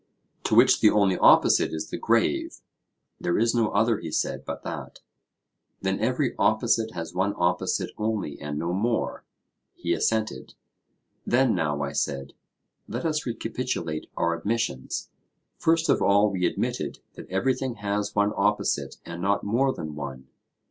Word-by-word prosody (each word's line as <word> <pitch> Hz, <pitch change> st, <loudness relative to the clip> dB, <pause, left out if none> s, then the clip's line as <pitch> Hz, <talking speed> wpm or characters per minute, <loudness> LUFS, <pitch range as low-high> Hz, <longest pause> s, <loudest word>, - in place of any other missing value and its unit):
To -, -, +2 dB
which -, -, +6 dB
the 105 Hz, -, +6 dB
only 100 Hz, -3 st, +3 dB
opposite -, -, +5 dB
is 80 Hz, -1 st, -5 dB
the -, -, -3 dB
grave? -, -, +1 dB, 0.6 s
There 85 Hz, -, 0 dB
is 115 Hz, +1 st, +2 dB
no 115 Hz, -3 st, +2 dB
other, 115 Hz, +1 st, +2 dB
he 85 Hz, -, -6 dB
said, -, -, -2 dB
but -, -, -6 dB
that. -, -, -7 dB, 0.8 s
Then 95 Hz, 0 st, 0 dB
every 125 Hz, +3 st, 0 dB
opposite 110 Hz, 0 st, +2 dB
has 80 Hz, 0 st, -5 dB
one 95 Hz, +3 st, 0 dB
opposite 90 Hz, +1 st, 0 dB
only 105 Hz, -9 st, -2 dB
and 75 Hz, 0 st, -4 dB
no 85 Hz, +3 st, -2 dB
more? 110 Hz, +4 st, -1 dB, 0.5 s
He -, -, -1 dB
assented. 110 Hz, -1 st, -1 dB, 0.7 s
Then 130 Hz, -1 st, +3 dB
now, 75 Hz, -2 st, 0 dB
I 70 Hz, -, -3 dB
said, 70 Hz, -1 st, -2 dB, 0.5 s
let -, -, -4 dB
us 155 Hz, -3 st, -1 dB
recapitulate 80 Hz, -8 st, -3 dB
our 85 Hz, 0 st, +1 dB
admissions. 85 Hz, -, -2 dB, 0.5 s
First 165 Hz, 0 st, +2 dB
of -, -, +3 dB
all 100 Hz, +1 st, +4 dB
we 90 Hz, -2 st, +1 dB
admitted -, -, -2 dB, 0.2 s
that -, -, -11 dB
everything 125 Hz, +6 st, 0 dB
has 105 Hz, 0 st, -2 dB
one 105 Hz, 0 st, +3 dB
opposite 105 Hz, +1 st, 0 dB
and 85 Hz, +1 st, -7 dB
not 100 Hz, +2 st, +1 dB
more 125 Hz, +6 st, +2 dB
than 75 Hz, -10 st, -6 dB
one? 65 Hz, -3 st, -7 dB
100 Hz, 150 wpm, -26 LUFS, 85-115 Hz, 0.8 s, which